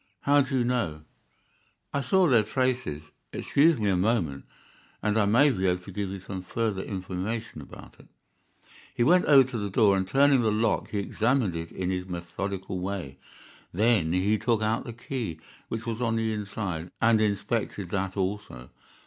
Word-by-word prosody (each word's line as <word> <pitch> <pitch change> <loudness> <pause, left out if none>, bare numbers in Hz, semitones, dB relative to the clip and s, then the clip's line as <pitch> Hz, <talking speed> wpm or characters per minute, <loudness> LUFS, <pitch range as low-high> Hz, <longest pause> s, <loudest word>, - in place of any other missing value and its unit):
"How 145 +1 +4
do 135 0 -1
you 125 - +2
know?" 115 -12 -1 0.9
"I 140 - 0
saw 185 +8 +3
their 120 -6 +5
traces. 125 - -1 0.3
Excuse 155 +2 +3
me 105 -2 -1
a - - +2
moment, 90 -8 0 0.6
and 105 - +1
I 110 -2 +3
may 130 +8 +5
be 95 -5 -1
able 90 0 0
to 100 - -10
give 100 0 -3
you 95 0 -6
some 95 0 -6
further 105 +1 -2
information 95 +4 -5
about - - -13
it." - - -17 0.9
He 120 - +2
went 180 +7 +4
over 135 -4 +6
to 120 - -3
the 100 -1 -3
door, 100 0 +4
and 95 -1 -1
turning 140 +3 +4
the 110 -2 +2
lock 110 +1 0
he 105 - -3
examined 110 0 0
it 80 0 -5
in 95 0 -3
his 90 0 -3
methodical 90 +2 -5
way. 90 -7 -5 0.5
Then 105 -4 +2
he 100 +4 +1
took 115 -1 +1
out 110 +1 0
the 120 - -6
key, 115 - -5 0.3
which 115 0 -5
was 115 0 -3
on 115 -2 +1
the 110 -1 0
inside, 100 -5 -4
and 110 -1 +4
inspected 105 -2 -1
that 95 0 -2
also. 95 -11 -4
105 Hz, 180 wpm, -27 LUFS, 95-120 Hz, 0.9 s, over